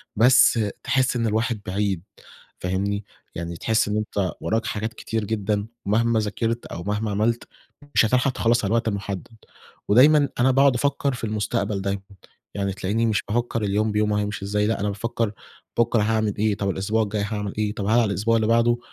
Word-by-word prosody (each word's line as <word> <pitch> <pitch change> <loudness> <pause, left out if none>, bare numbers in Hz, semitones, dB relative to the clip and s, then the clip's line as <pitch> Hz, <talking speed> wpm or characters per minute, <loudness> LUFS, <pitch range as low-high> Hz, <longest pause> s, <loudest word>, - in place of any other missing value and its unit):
بس 120 +1 +6 0.2
تحس 130 -1 +1
إن 115 -1 0
الواحد 110 +1 0
بعيد 95 -2 -1 0.6
فاهمني؟ 100 +3 -1 0.3
يعني 85 0 -5
تحس 110 +2 +1
إن 105 - -1
أنت 105 -3 -1
وراك 115 +1 0
حاجات 110 0 -3
كتير 110 -1 -3
جدًا، 105 0 -1 0.2
مهما 115 +2 +2
ذاكرت 115 +2 -2
أو 85 - -7
مهما 105 +2 -2
عملت، 110 +4 0 0.5
مش - - +6
هتلحق 125 +4 +2
تخلَّص 120 -1 +1
على - - -1
الوقت 115 -1 +1
المحدد، 100 -3 -3 0.6
ودايمًا 145 +6 +6
أنا 130 +2 +4
باقعد 135 0 +4
أفكر 140 +1 0
في 125 - -7
المستقبل 105 -2 -1
دايمًا 100 0 -2 0.5
يعني، 100 -1 -1
تلاقيني 100 +4 -1
مش 110 -2 +1
بافكر 115 0 -1
اليوم 105 +2 +1
بيومه 105 0 +1
هيمشي 105 -1 -4
إزاي، 105 +1 0
لأ 115 - 0
أنا 105 - -1
بافكر 115 +1 -2 0.5
بكرة 115 -2 +3
هاعمل 110 -1 0
إيه، 105 0 +1
طب 100 -1 -1
الأسبوع 100 +4 0
الجاي 105 0 -2
هاعمل 105 -2 -3
إيه، 105 -1 0
طب 105 -2 -4
هل 105 - +1
على 120 - +3
الأسبوع 105 +3 +1
اللي 110 -1 +2
بعده 115 +1 +3
110 Hz, 180 wpm, -23 LUFS, 100-115 Hz, 0.6 s, بس